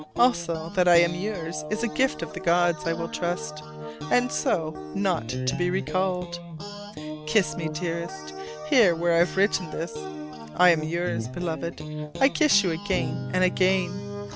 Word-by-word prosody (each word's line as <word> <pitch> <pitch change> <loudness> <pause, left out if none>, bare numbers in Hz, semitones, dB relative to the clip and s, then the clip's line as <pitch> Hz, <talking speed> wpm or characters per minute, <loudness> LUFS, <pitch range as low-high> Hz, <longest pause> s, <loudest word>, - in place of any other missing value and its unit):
Also 170 -9 +1
that 180 -2 +2
I 175 - +7
am 170 0 +5
yours 175 -5 -4
is 220 +2 -2
a - - +2
gift 265 +3 0
of - - -7
the - - -6
gods, 170 -1 +2
I 165 - +2
will - - -4
trust: 75 0 -3 0.5
and 125 0 +3
so, 155 - 0 0.2
not 115 +3 0
to 130 0 -1
be 175 0 +1
recalled! 180 -1 -1 0.9
Kiss 190 +5 +2
me, 160 -2 -3
dearest; 155 - -5 0.3
here 170 - +5
where 170 +1 +1
I 165 - +4
have 175 +2 +2
written 190 -3 +2
this! 165 +2 -5 0.6
I 180 -1 +7
am 165 -2 +2
yours, 155 -8 -2
Beloved. 165 +2 -4 0.4
I 270 - +6
kiss 290 -10 +4
you 180 - +1
again 190 +4 -2
and 185 - +3
again. 185 0 +2
170 Hz, 165 wpm, -26 LUFS, 155-185 Hz, 0.9 s, I